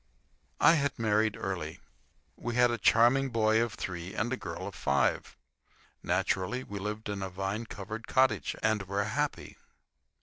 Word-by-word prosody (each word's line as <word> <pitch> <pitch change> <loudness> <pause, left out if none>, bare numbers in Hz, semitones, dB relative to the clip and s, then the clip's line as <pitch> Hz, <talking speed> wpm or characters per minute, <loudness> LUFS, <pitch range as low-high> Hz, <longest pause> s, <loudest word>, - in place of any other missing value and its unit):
I 165 - +7
had 140 -1 -1
married 110 -1 +1
early. 90 -5 -4 0.6
We 120 -1 -4
had 120 0 +5
a 120 - -2
charming 125 +4 +4
boy 110 -1 +3
of 115 -2 -1
three 90 +1 -5
and 120 +3 -1
a - - +1
girl - - -6
of - - -6
five. - - 0 0.6
Naturally, 100 +7 0
we 100 -4 -6
lived 105 +2 -4
in 100 -1 -3
a 95 - -3
vine 95 +5 -3
covered 110 +3 -7
cottage, 130 0 +2
and 110 -1 +2
were 100 +1 0
happy. 140 +8 -3
110 Hz, 160 wpm, -30 LUFS, 100-120 Hz, 0.6 s, I